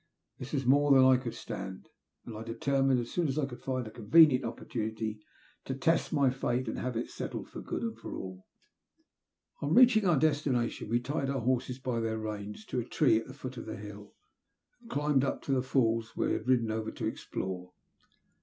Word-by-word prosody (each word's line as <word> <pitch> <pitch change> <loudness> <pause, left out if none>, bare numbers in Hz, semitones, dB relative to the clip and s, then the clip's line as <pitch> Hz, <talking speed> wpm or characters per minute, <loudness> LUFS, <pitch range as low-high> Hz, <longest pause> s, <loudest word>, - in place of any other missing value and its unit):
This 125 - -7
was 135 -3 0
more 145 +3 +4
than 130 -1 +7
I 130 -1 +6
could 125 -2 -5
stand, 95 0 -7 0.4
and 115 - -7
I 110 - -6
determined, 135 +3 +1
as 120 0 -5
soon 175 -2 +1
as 135 +1 -2
I 150 - +2
could 125 -3 -9
find 130 -2 -2
a 110 - -8
convenient 130 +4 +5
opportunity, 110 -2 -4 0.5
to 130 - -3
test 160 +5 +1
my 140 -4 +3
fate 125 -1 -1
and 110 - -3
have 125 -2 -2
it 115 - -3
settled - - -5
for - - -8
good - - -4
and 115 -1 -2
all. 95 0 -7 1.1
On 145 +4 +1
reaching 235 -5 +6
our 170 -4 +4
destination, 135 -7 0
we 120 +1 +2
tied 135 +2 -2
our 135 -2 -1
horses, 125 +1 0
by 125 -3 -2
their 110 -1 -1
reins, 105 -1 -6
to - - -2
a - - -1
tree 130 0 +3
at 115 - -9
the 130 - -10
foot 130 -2 -7
of - - -7
the 110 - -5
hill, 105 0 -10 0.7
and 230 - -15
climbed 145 - +2
up 135 - -2
to - - -3
the 130 -1 +3
falls 115 -3 0
we - - +1
had - - -3
ridden 120 -4 +3
over 110 0 -2
to - - -5
explore. 90 -1 -4
125 Hz, 205 wpm, -31 LUFS, 110-135 Hz, 1.1 s, than